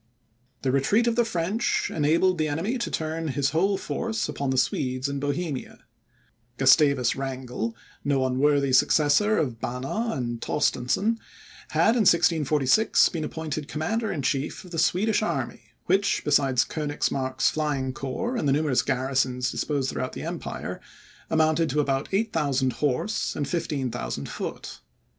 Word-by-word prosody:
The 130 Hz, -, +1 dB
retreat 140 Hz, -, +2 dB
of 235 Hz, -1 st, +1 dB
the 240 Hz, -, +4 dB
French, 210 Hz, +2 st, -1 dB
enabled 165 Hz, +4 st, +2 dB
the 155 Hz, -, +1 dB
enemy 180 Hz, -, -2 dB
to 235 Hz, -, -2 dB
turn 160 Hz, +1 st, -3 dB
his 135 Hz, -1 st, 0 dB
whole 195 Hz, +5 st, +2 dB
force 225 Hz, +2 st, -2 dB
upon 140 Hz, -1 st, -3 dB
the 130 Hz, -, 0 dB
Swedes 130 Hz, 0 st, 0 dB
in 140 Hz, 0 st, -3 dB
Bohemia. 145 Hz, 0 st, -4 dB, 0.7 s
Gustavus 135 Hz, -2 st, +4 dB
Wrangel, 130 Hz, -4 st, -4 dB, 0.3 s
no 135 Hz, -2 st, +1 dB
unworthy 140 Hz, +1 st, +2 dB
successor 150 Hz, +9 st, +4 dB
of 125 Hz, -6 st, -1 dB
Banner 135 Hz, -, -2 dB
and 120 Hz, -2 st, -3 dB
Torstensohn, 170 Hz, -, 0 dB, 0.5 s
had, -, -, +3 dB
in 230 Hz, -4 st, +5 dB
1646, 160 Hz, +2 st, +3 dB
been 165 Hz, -3 st, -4 dB
appointed 155 Hz, -1 st, -4 dB
Commander 215 Hz, +10 st, -2 dB
in 140 Hz, -, -3 dB
chief 135 Hz, +6 st, -2 dB
of 180 Hz, -, -13 dB
the 165 Hz, -, -2 dB
Swedish 210 Hz, +7 st, +2 dB
army, -, -, -3 dB, 0.2 s
which, 200 Hz, +1 st, +2 dB
besides 135 Hz, -4 st, +3 dB
Koenigsmark's 145 Hz, -3 st, -1 dB
flying 140 Hz, -4 st, -1 dB
corps 150 Hz, -, -3 dB
and 150 Hz, -, -1 dB
the 135 Hz, -, +3 dB
numerous 145 Hz, -3 st, +2 dB
garrisons 130 Hz, -1 st, 0 dB
disposed 140 Hz, -3 st, -1 dB
throughout 130 Hz, -, -3 dB
the -, -, -6 dB
empire, -, -, -5 dB, 0.5 s
amounted 160 Hz, 0 st, +2 dB
to 145 Hz, +3 st, 0 dB
about 135 Hz, -1 st, 0 dB
8,000 150 Hz, -, 0 dB
horse, 150 Hz, +9 st, -1 dB
and 145 Hz, -2 st, -2 dB
15,000 135 Hz, -, -3 dB
foot. -, -, -6 dB
145 Hz, 145 wpm, -26 LUFS, 130-170 Hz, 0.7 s, in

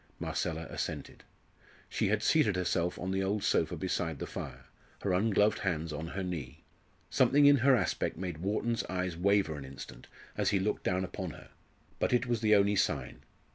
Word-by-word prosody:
Marcella 80 Hz, 0 st, -2 dB
assented. -, -, -5 dB, 0.6 s
She -, -, 0 dB
had 110 Hz, +2 st, +1 dB
seated 110 Hz, -10 st, +3 dB
herself 90 Hz, -1 st, 0 dB
on 90 Hz, +1 st, -3 dB
the 95 Hz, 0 st, 0 dB
old 100 Hz, +2 st, -1 dB
sofa -, -, +1 dB
beside 90 Hz, -4 st, -2 dB
the -, -, -4 dB
fire, -, -, -7 dB, 0.4 s
her 95 Hz, -, +1 dB
ungloved 105 Hz, +2 st, +3 dB
hands 80 Hz, -4 st, -2 dB
on 80 Hz, +2 st, -4 dB
her 95 Hz, +3 st, -4 dB
knee. 80 Hz, -9 st, -5 dB, 0.5 s
Something 145 Hz, +1 st, +5 dB
in 145 Hz, 0 st, +8 dB
her 130 Hz, +1 st, +5 dB
aspect 120 Hz, -, -1 dB
made 90 Hz, -4 st, -4 dB
Wharton's 110 Hz, +5 st, -1 dB
eyes 90 Hz, -1 st, -2 dB
waver 95 Hz, -2 st, +2 dB
an -, -, -7 dB
instant 65 Hz, -2 st, -10 dB, 0.3 s
as -, -, +1 dB
he 100 Hz, -, +2 dB
looked 105 Hz, +3 st, -1 dB
down 95 Hz, 0 st, 0 dB
upon 95 Hz, 0 st, -4 dB
her -, -, -12 dB, 0.5 s
but -, -, +1 dB
it 125 Hz, +1 st, +3 dB
was 120 Hz, -3 st, -1 dB
the 110 Hz, -1 st, +5 dB
only 100 Hz, 0 st, +4 dB
sign. -, -, -1 dB
95 Hz, 180 wpm, -31 LUFS, 85-105 Hz, 0.6 s, in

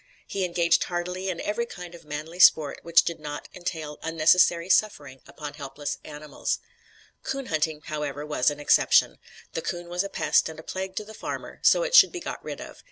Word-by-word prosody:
He 195 Hz, -2 st, -2 dB
engaged 170 Hz, -1 st, +2 dB
heartily 180 Hz, +2 st, -3 dB
in 180 Hz, -, -3 dB
every 235 Hz, +3 st, -2 dB
kind 180 Hz, -4 st, -9 dB
of 170 Hz, -, -13 dB
"manly 155 Hz, +4 st, -6 dB
sport" 155 Hz, -5 st, +5 dB
which 170 Hz, 0 st, +5 dB
did 170 Hz, -1 st, -4 dB
not 150 Hz, -1 st, -7 dB
entail 160 Hz, -4 st, -5 dB
unnecessary 170 Hz, +1 st, +3 dB
suffering 145 Hz, -10 st, +1 dB
upon 150 Hz, -2 st, -8 dB
helpless 145 Hz, 0 st, -5 dB
animals. 150 Hz, 0 st, -4 dB, 0.6 s
Coon 275 Hz, -1 st, -4 dB
hunting, 155 Hz, -4 st, -1 dB
however, 150 Hz, -1 st, -4 dB
was 150 Hz, -4 st, +2 dB
an 145 Hz, 0 st, -6 dB
exception. 145 Hz, -, +4 dB, 0.3 s
The 165 Hz, -, -2 dB
coon 175 Hz, +1 st, -5 dB
was 175 Hz, +2 st, -1 dB
a 200 Hz, -, -5 dB
pest -, -, +2 dB
and 160 Hz, -1 st, -9 dB
a -, -, -10 dB
plague 190 Hz, +2 st, -5 dB
to 215 Hz, -, -3 dB
the 220 Hz, -, -11 dB
farmer, -, -, -6 dB
so -, -, +5 dB
it -, -, -3 dB
should -, -, +8 dB
be 360 Hz, -, -5 dB
got -, -, -6 dB
rid -, -, -6 dB
of. -, -, -10 dB
165 Hz, 195 wpm, -26 LUFS, 150-180 Hz, 0.6 s, should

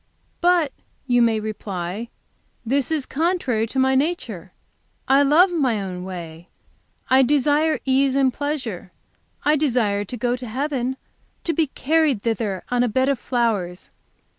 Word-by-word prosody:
'But,' 345 Hz, -5 st, +3 dB, 0.3 s
you 245 Hz, -2 st, +3 dB
may 225 Hz, -2 st, +3 dB
reply, 205 Hz, 0 st, -5 dB, 0.6 s
'this 270 Hz, +3 st, 0 dB
is 310 Hz, -4 st, -1 dB
contrary 275 Hz, -8 st, 0 dB
to 265 Hz, -, -6 dB
my 265 Hz, 0 st, +3 dB
nature. 315 Hz, +7 st, -2 dB, 0.6 s
I 270 Hz, +1 st, +5 dB
love 315 Hz, +7 st, +5 dB
my 260 Hz, -10 st, +1 dB
own 185 Hz, -2 st, -5 dB
way. 170 Hz, -2 st, -8 dB, 0.6 s
I 260 Hz, +1 st, +7 dB
desire 295 Hz, +4 st, +2 dB
ease 270 Hz, 0 st, +2 dB
and 265 Hz, -2 st, +3 dB
pleasure; 260 Hz, -, -4 dB, 0.5 s
I 300 Hz, +1 st, +4 dB
desire 235 Hz, -9 st, +1 dB
to 245 Hz, +5 st, -7 dB
go 245 Hz, +1 st, 0 dB
to 250 Hz, 0 st, -8 dB
heaven, 265 Hz, +1 st, -2 dB, 0.5 s
to 335 Hz, -, 0 dB
be 325 Hz, -2 st, +1 dB
carried 295 Hz, -4 st, +1 dB
thither 220 Hz, -5 st, -2 dB
on 245 Hz, 0 st, +2 dB
a 245 Hz, -, +3 dB
bed 260 Hz, +4 st, +1 dB
of 275 Hz, -4 st, 0 dB
flowers. 215 Hz, -9 st, -1 dB
255 Hz, 145 wpm, -22 LUFS, 220-290 Hz, 0.6 s, I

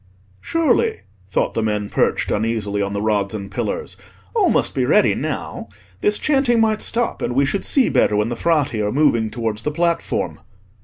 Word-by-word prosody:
"Surely," 385 Hz, +7 st, +1 dB, 0.3 s
thought -, -, 0 dB
the 115 Hz, -, -1 dB
men 105 Hz, -2 st, -1 dB
perched -, -, 0 dB
uneasily 105 Hz, -2 st, -1 dB
on 100 Hz, 0 st, -2 dB
the 100 Hz, -, -2 dB
rods 105 Hz, -1 st, 0 dB
and 100 Hz, -2 st, -6 dB
pillars, -, -, -3 dB, 0.4 s
"all -, -, +3 dB
must -, -, +2 dB
be -, -, 0 dB
ready -, -, +4 dB
now. -, -, -4 dB, 0.3 s
This 210 Hz, -, +2 dB
chanting 270 Hz, -5 st, +2 dB
might 220 Hz, -1 st, +2 dB
stop, 235 Hz, 0 st, -1 dB
and 120 Hz, -, -2 dB
we 140 Hz, +1 st, +3 dB
should 195 Hz, +8 st, -2 dB
see 270 Hz, -3 st, +3 dB
better 105 Hz, -, +2 dB
when 105 Hz, +2 st, +1 dB
the 120 Hz, -, -3 dB
Frati 145 Hz, -6 st, +1 dB
are 105 Hz, 0 st, 0 dB
moving 125 Hz, -6 st, +2 dB
towards 110 Hz, -2 st, -3 dB
the 150 Hz, -, -1 dB
platform." 170 Hz, +2 st, -1 dB
115 Hz, 185 wpm, -20 LUFS, -, 0.4 s, ready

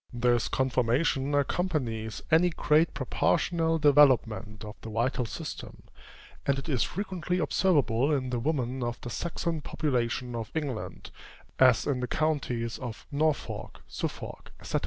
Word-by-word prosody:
This 120 Hz, -1 st, +2 dB
conformation 130 Hz, +2 st, +1 dB
accompanies 130 Hz, -, -1 dB
any 165 Hz, +3 st, +5 dB
great 155 Hz, 0 st, +2 dB
proportional 165 Hz, +4 st, +1 dB
developement 120 Hz, -8 st, +3 dB
of 105 Hz, +1 st, -8 dB
the 115 Hz, -, -7 dB
vital 120 Hz, +2 st, 0 dB
system; -, -, -7 dB, 0.6 s
and 140 Hz, 0 st, +1 dB
it 135 Hz, -, -5 dB
is 130 Hz, -6 st, 0 dB
frequently 185 Hz, -3 st, -2 dB
observable 145 Hz, -7 st, +2 dB
in 130 Hz, -3 st, 0 dB
the 120 Hz, -, 0 dB
woman 130 Hz, -2 st, -1 dB
of 120 Hz, 0 st, -3 dB
the 120 Hz, -, -6 dB
Saxon 170 Hz, -1 st, -2 dB
population 125 Hz, -4 st, -1 dB
of 115 Hz, -2 st, -4 dB
England, 140 Hz, -8 st, -4 dB, 0.5 s
as 130 Hz, -3 st, +5 dB
in 140 Hz, -3 st, 0 dB
the 125 Hz, -, -2 dB
counties 125 Hz, -7 st, -1 dB
of 120 Hz, -4 st, -7 dB
Norfolk, 150 Hz, +1 st, -1 dB
Suffolk, -, -, -6 dB
&c. -, -, 0 dB
130 Hz, 135 wpm, -28 LUFS, 120-155 Hz, 0.6 s, any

